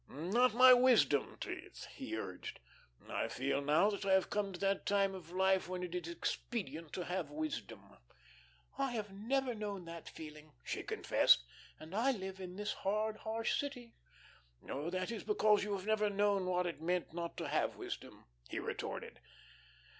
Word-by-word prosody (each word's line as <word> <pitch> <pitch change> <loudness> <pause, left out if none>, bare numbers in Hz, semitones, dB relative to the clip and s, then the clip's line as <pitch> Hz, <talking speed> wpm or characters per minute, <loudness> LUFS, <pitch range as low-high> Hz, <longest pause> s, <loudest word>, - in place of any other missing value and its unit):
"Not 210 - +2
my 255 +1 +10
wisdom 245 - +4
teeth," - - -6
he - - -5
urged. - - -6 0.5
"I - - -1
feel 135 +2 -1
now 155 +9 +4
that 200 - -4
I 195 -1 +3
have 190 -1 +3
come 205 -1 0
to 180 - -8
that 195 0 +1
time 200 -1 +3
of 180 -4 -9
life 190 0 +2
when 180 0 -3
it 180 -1 -5
is 175 -1 -3
expedient 165 - -3
to 180 - -3
have 180 -4 -2
wisdom." 155 +1 -5 0.8
"I 270 -2 +1
have 210 -3 -3
never 250 +5 0
known 205 -4 -4
that 165 -1 -8
feeling," 155 -1 -10
she - - -3
confessed, 60 - +4 0.4
"and 160 +3 -10
I 245 +6 +3
live 190 -3 -6
in 180 -1 -7
the 210 +1 -5
'hard, 215 +2 0
harsh' 225 +1 -1
city." 250 -5 -5 0.7
"Oh, 145 +5 -3
that 185 +3 -2
is 230 - -4
because 215 - +4
you 205 0 -2
have 190 -1 -3
never 215 -1 +2
known 200 -2 +2
what 180 0 +1
it 170 -3 -4
meant 175 0 -1
not 170 0 -4
to - - -3
have - - +1
wisdom," - - -7 0.2
he - - -4
retorted. - - -4
190 Hz, 175 wpm, -36 LUFS, 170-215 Hz, 0.8 s, my